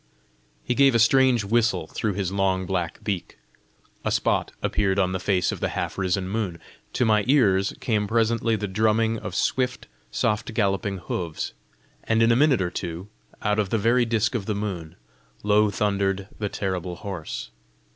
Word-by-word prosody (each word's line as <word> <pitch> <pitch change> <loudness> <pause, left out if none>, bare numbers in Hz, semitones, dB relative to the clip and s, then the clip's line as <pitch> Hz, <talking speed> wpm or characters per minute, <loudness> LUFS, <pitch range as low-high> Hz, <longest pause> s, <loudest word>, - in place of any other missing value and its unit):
He - - 0
gave 135 -1 +4
a - - +6
strange 125 0 +4
whistle 110 -4 +1
through 105 +5 -2
his 95 -1 -2
long 95 -1 +1
black 90 -3 -3
beak. 95 -5 -3 0.7
A - - 0
spot - - +1
appeared 100 -2 +1
on 95 -2 +2
the 95 - -2
face 90 -2 +1
of - - -5
the - - -1
half - - -2
risen 95 0 -1
moon. 100 -4 -2 0.4
To 125 - +1
my 105 -2 +3
ears 100 -9 +3
came 105 -3 0
presently 115 +1 +1
the 105 -1 -3
drumming 110 +3 +1
of - - -6
swift, 125 -1 0 0.2
soft 110 +1 -1
galloping 100 -1 0
hoofs, 85 -2 -4 0.5
and 110 +1 +2
in 115 - +5
a - - +4
minute 135 -6 +4
or 90 - -2
two, 85 +3 -5 0.3
out 105 0 +1
of 100 -3 0
the 115 - +1
very 120 +3 +3
disc 115 -1 +1
of 110 -6 -3
the 105 - 0
moon, 90 -6 -4 0.5
low 105 +1 +4
thundered 100 -1 0
the 105 -2 -1
terrible 90 -3 -3
horse. 95 -6 -6
105 Hz, 175 wpm, -25 LUFS, 95-115 Hz, 0.7 s, a